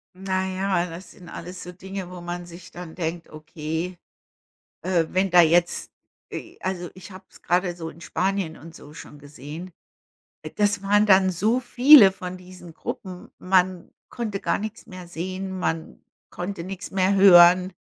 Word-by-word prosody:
Na 190 0 -2
ja, 185 -2 -1
das 170 +3 -10
sind 175 -2 -14
alles 180 +2 -8
so 180 - -8
Dinge, 190 0 -7
wo 180 -1 -9
man 175 0 -6
sich 175 +1 -13
dann 175 -2 -9
denkt, 170 -1 -4
okay, 160 +3 -5 0.9
äh, 175 -3 +1
wenn 190 0 0
da 175 0 +8
jetzt 170 +1 +2 0.4
e - - -8
also, 180 -2 -3
ich 185 +2 -12
habe 185 0 -12
es - - -19
grade 175 0 0
so 165 -2 -6
in 165 +2 -15
Spanien 190 -4 -2
und 165 +2 -13
so 150 - -13
schon 150 - -12
gesehen. 150 +5 -10 0.8
Das 205 -1 +1
waren 205 +1 +3
dann 190 -2 +5
so 215 +7 +1
viele 250 -3 +7
von 185 -1 -7
diesen 180 -2 -13
Gruppen. 180 +2 -7
Man 185 -1 +1 0.2
konnte 215 -4 -4
gar - - 0
nix 215 +2 -7
mehr 185 -1 -10
sehen. 185 +3 -5
Man 165 -3 -3 0.3
konnte 180 0 -6
nix 190 +1 -7
mehr 190 +1 +2
hören. 180 -1 +7
180 Hz, 165 wpm, -24 LUFS, 175-190 Hz, 0.9 s, da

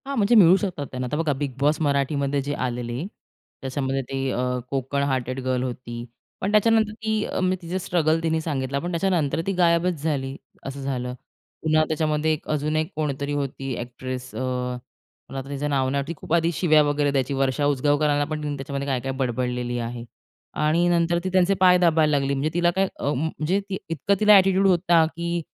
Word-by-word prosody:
हां. 280 - -3
म्हणजे, 215 +2 +3
मिळू 185 -4 +8
शकतात 180 -9 -3
त्यांना. 125 -1 -3
आता 150 - -2
बघा, 160 -2 +1
बिग 140 -2 -1
बॉस 150 +2 +2
मराठीमध्ये 140 -1 +1
जे 145 +2 -3
आलेली, 120 +4 -4 0.6
त्याच्यामध्ये 135 0 -2
ते 135 - -4 0.2
अ, - - -2 0.3
कोकण 140 +1 -1
हार्टेड 130 -2 -1
गर्ल 130 -1 0
होती, 120 -2 -5 0.4
पण 195 - 0
त्याच्यानंतर 220 0 +3
ती, 220 -1 -1
अ - - -3
म्हणजे 185 0 +1
तिचा 175 +2 -3
स्ट्रगल 165 -3 +1
तिने 160 -1 +1
सांगितला. 140 -3 -2
पण 175 +4 -4
त्याच्यानंतर 170 -4 0
ती - - +2
गायबच 170 -2 +2
झाली, 135 -4 -1 0.3
असं 135 +1 -6
झालं. 125 -2 -3 0.5
पुन्हा 155 0 +3
त्याच्यामध्ये 155 0 0
एक 155 - -6
अजून 150 0 0
एक 155 0 -1
कोणीतरी 145 -2 -2
होती 135 -1 -3
एक्ट्रेस, 125 +1 -6
अ, - - -4 0.9
पण - - -9
आता 135 +1 -6
तिचं 145 +1 -3
नाव 135 -2 +1
न, 140 +1 0
ती 170 - -3
खूप 160 - -5
आधी 170 0 +3
शिव्या 155 -2 +4
वगैरे 145 0 +1
द्यायची, 135 0 0
वर्षा 135 +1 0
उजगावकरांना 145 +1 +2
पण 155 0 -4
तिने 145 -1 -2
त्याच्यामध्ये 140 0 -4
काय 130 -2 0
काय 135 +2 -3
बडबडलेली 125 -1 -1
आहे 120 0 -5 0.6
आणि 160 +3 +3
नंतर 170 0 +2
ती 185 - -1
त्यांचे 185 +1 +4
पाय 180 -1 +6
दाबायला 160 -4 +3
लागली. 140 0 0
म्हणजे 140 +3 0
तिला 175 0 +2
काय, 195 0 +2
अ, 145 - 0
म्हणजे 160 +6 -1
ती 190 - -2
इतकं 165 +5 +1
तिला 210 -1 +7
एटिट्यूड 195 0 +4
होता 175 -3 +4
की 170 0 -2
150 Hz, 190 wpm, -24 LUFS, 135-170 Hz, 0.9 s, मिळू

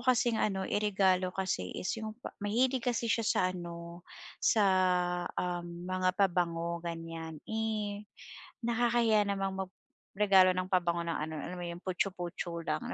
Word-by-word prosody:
kasing 240 -2 +4
ano 195 -2 0
iregalo 190 -3 +2
kasi 185 - -1
is - - -2
yung 215 -1 -4 0.3
mahilig 245 +4 +1
kasi 240 -1 0
siya 225 0 +2
sa - - +3
ano, 170 0 -8 0.4
sa, 215 -2 +4 0.7
um, 175 -1 -3
mga 185 0 +1
pabango, 170 -3 +1
ganiyan. 165 -2 -5
Eh, 215 -2 -2 0.6
nakakahiya 235 -2 +3
namang 195 -1 -1
mag-regalo 190 0 +2
ng 185 0 -1
pabango 175 -2 +2
ng 165 - -1
ano, 160 +1 -3
alam 180 - -6
mo 175 - -4
yun, 170 0 -5
putchu-putchu 175 -2 -2
lang. 245 0 -2
185 Hz, 135 wpm, -32 LUFS, 170-210 Hz, 0.7 s, kasing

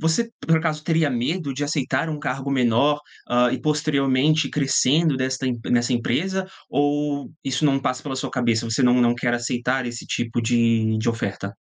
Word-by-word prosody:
Você, 165 +9 +1
por 165 - +2
acaso, 155 -2 -2
teria 160 -3 +2
medo 140 +5 -2
de 145 +2 -3
aceitar 145 0 -1
um 155 -1 -4
cargo 135 -1 -3
menor, 135 +3 +2 0.3
hã, 120 0 +3
e - - -2
posteriormente 150 -1 +2
crescendo 145 +2 +2
desta 130 0 -2
em 125 -2 -1
nesta 120 +1 +2
empresa, 185 +11 -1 0.2
ou 145 0 0
isso 135 +2 -1
não 135 -2 +3
passa 130 -1 -2
pela 135 -2 -4
sua 130 - -3
cabeça, 120 -2 0
você 115 +4 +1
não 125 0 +4
não 120 0 +3
quer 120 0 0
aceitar 125 +2 -1
esse 120 -1 -7
tipo 120 0 -2
de 115 -1 +2
de 110 +2 -1
oferta? 100 -3 -3
130 Hz, 180 wpm, -23 LUFS, 120-150 Hz, 0.3 s, não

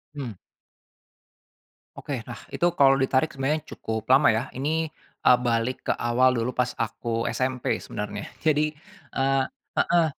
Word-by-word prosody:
Hmm. 130 -6 -5 1.6
Oke. 130 -5 -5
Nah, 120 -5 -8
itu - - 0
kalau 135 -4 +5
ditarik 130 +3 +2
sebenarnya 140 +3 -1 0.2
cukup 110 0 -4
lama 135 +3 +6
ya. 110 +2 0
Ini, 160 +4 0 0.3
eee, 125 - +6
balik 115 +1 0
ke - - +2
awal 125 +2 +3
dulu 115 0 0
pas 125 0 0
aku 115 0 -2
SMP 130 -1 -1
sebenarnya. 105 0 -5 0.2
Jadi, 155 -1 +2 0.4
eee 135 0 +2 0.3
heeh, 170 -1 +4
130 Hz, 135 wpm, -26 LUFS, 120-145 Hz, 1.6 s, lama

